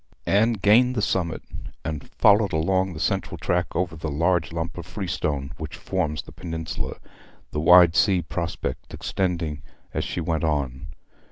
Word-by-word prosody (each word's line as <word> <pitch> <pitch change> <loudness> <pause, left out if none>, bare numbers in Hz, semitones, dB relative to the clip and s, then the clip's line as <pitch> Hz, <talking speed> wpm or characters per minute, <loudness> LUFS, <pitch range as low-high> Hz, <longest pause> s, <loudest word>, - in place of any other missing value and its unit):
Anne 110 +4 +3
gained 115 +5 +4
the - - 0
summit, 85 -5 -1 0.4
and 75 -3 -4
followed 105 -1 +4
along 95 +4 +1
the 75 - -7
central - - -1
track 90 0 0
over 85 -1 0
the 80 0 -4
huge 85 +4 +1
lump 80 0 -3
of - - -5
freestone 80 -7 -3
which 80 -1 -6
forms 85 -6 -2
the - - -13
peninsula, 80 -2 -5 0.5
the 75 - -2
wide 85 +1 +7
sea 95 -3 +4
prospect 85 +1 -4
extending 85 -6 -2 0.3
as - - -1
she - - -3
went 80 -1 -1
on. 70 -3 -1
85 Hz, 155 wpm, -24 LUFS, 80-95 Hz, 0.5 s, wide